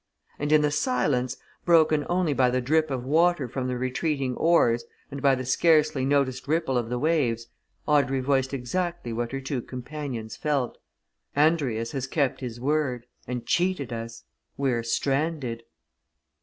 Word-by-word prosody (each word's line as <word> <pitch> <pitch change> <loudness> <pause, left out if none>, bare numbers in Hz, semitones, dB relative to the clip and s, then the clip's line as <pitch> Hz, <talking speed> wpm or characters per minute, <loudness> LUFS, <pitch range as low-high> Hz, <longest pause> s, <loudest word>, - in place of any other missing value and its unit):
And 145 +1 -1
in 155 -1 +5
the 150 - +2
silence, 125 -2 0 0.3
broken 155 -3 +4
only 175 -3 +1
by 130 -1 +3
the 130 +1 +1
drip 155 +5 +1
of 130 -2 -3
water 160 0 +3
from 130 +1 -3
the 125 -1 -2
retreating 130 +1 -1
oars, 120 -9 +3 0.3
and 140 0 -6
by 135 -1 +4
the 130 0 -5
scarcely 155 0 +3
noticed 135 -2 +1
ripple 160 -3 +1
of 120 -2 0
the 125 - -1
waves, 125 -6 +1 0.4
Audrey 140 -3 +2
voiced 135 0 +1
exactly 140 +1 -3
what 120 +1 -2
her 135 - -3
two 135 -1 -3
companions 125 -3 -6
felt. 140 -4 -1 0.6
"Andrius 140 -7 +2
has 135 -2 -3
kept 140 -2 0
his 120 -2 -5
word 130 -3 0 0.2
and 125 -1 -4
cheated 175 -9 0
us! 115 0 -6 0.3
We're 130 -4 +1
stranded!" 135 0 -1
135 Hz, 155 wpm, -26 LUFS, 125-150 Hz, 0.6 s, in